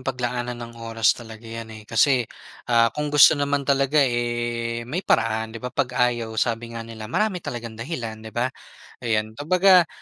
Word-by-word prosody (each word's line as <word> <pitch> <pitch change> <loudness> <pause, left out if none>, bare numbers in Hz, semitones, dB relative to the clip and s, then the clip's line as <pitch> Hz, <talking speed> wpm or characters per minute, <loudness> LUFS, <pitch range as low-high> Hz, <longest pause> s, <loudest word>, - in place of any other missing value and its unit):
paglaanan 125 -1 -3
ng 115 0 -8
oras 115 -1 +2
talaga 115 -1 -11
'yan, 115 0 -7
eh. 110 -1 -10
Kasi, 130 +1 +3 0.5
ah, 115 0 +5
kung 150 0 -2
gusto 150 +1 +8
naman 145 0 0
talaga, 140 +1 +2
eh, 120 -2 -1
may 175 +8 -3
paraan 110 0 +1
'di 115 - -7
ba, 125 - -4
'pag 130 -1 -1
ayaw 120 -2 +1
sabi 115 0 -1
nga 115 - -5
nila 115 -1 -8
marami 190 -2 0
talagang 115 -2 -6
dahilan, 115 -4 -5
'di 110 - -9
ba? 120 +2 0 0.5
Ayan, 110 -2 -1
kumbaga 180 - +4
120 Hz, 175 wpm, -23 LUFS, 115-140 Hz, 0.5 s, gusto